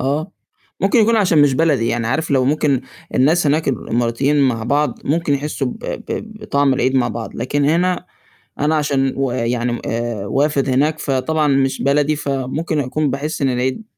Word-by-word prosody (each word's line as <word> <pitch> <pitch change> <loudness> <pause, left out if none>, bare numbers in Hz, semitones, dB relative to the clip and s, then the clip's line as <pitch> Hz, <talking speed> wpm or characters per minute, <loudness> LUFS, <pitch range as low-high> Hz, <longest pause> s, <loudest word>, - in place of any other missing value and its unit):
آه، 150 +7 -1 0.5
ممكن 195 +5 +3
يكون 225 +1 +4
عشان 180 -8 +4
مش 140 -2 +3
بلدي، 140 -6 +2
يعني 115 -1 -1
عارف 155 +7 -1
لو 130 -2 +3
ممكن 140 -1 +1 0.3
الناس 155 +5 +3
هناك 155 +2 +1
الإماراتيين 120 +3 0
مع 115 -3 -2
بعض 145 -1 0
ممكن 155 -1 +1
يحسّوا 140 -1 -2
ب 125 - -5
ب 220 -1 -5
بطعم 140 -7 +2
العيد 130 0 0
مع 125 -2 +2
بعض، 115 0 -6
لكن 140 +4 -1
هنا 175 +4 +1 0.5
أنا 150 +2 +2
عشان 140 -3 +1
ويعني 125 -2 -1
م 120 - -4
آآ 115 -3 -3
وافِد 140 +3 +1
هناك 145 +4 +1
فطبعًا 150 +3 0
مش 135 -1 +1
بلدي، 145 +2 +2
فممكن 145 +3 -2
أكون 145 +2 -1
باحس 150 +2 -3
إن 135 - +3
العيد 130 - -2
140 Hz, 170 wpm, -18 LUFS, 130-155 Hz, 0.5 s, يكون